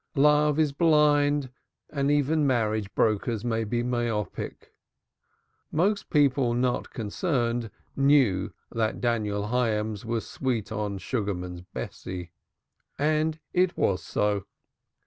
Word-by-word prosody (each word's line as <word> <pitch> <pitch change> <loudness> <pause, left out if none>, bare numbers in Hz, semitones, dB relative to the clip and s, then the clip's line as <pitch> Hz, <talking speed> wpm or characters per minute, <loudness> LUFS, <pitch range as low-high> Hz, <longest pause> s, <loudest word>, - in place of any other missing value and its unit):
Love 150 +1 +4
is 155 -2 +3
blind, 145 -3 +3 0.4
and 140 -1 0
even 145 +1 +2
marriage 110 -5 0
brokers 110 +1 +1
may 115 -1 0
be 120 +2 -1
myopic. 120 -4 -3 1.0
Most 200 +6 +1
people 135 -5 +3
not 125 0 0
concerned 120 - -1 0.3
knew 135 -9 +3 0.2
that 110 -2 -1
Daniel 105 -4 -1
Hyams 110 -4 0
was 115 -1 -2
"sweet 120 -7 -2
on" 105 -2 -2
Sugarman's 90 -4 -3
Bessie. 90 -1 -7 0.7
And 155 +2 +1
it 180 0 +2
was 95 - +1
so. 105 -2 -1
120 Hz, 110 wpm, -27 LUFS, 105-145 Hz, 1.0 s, Love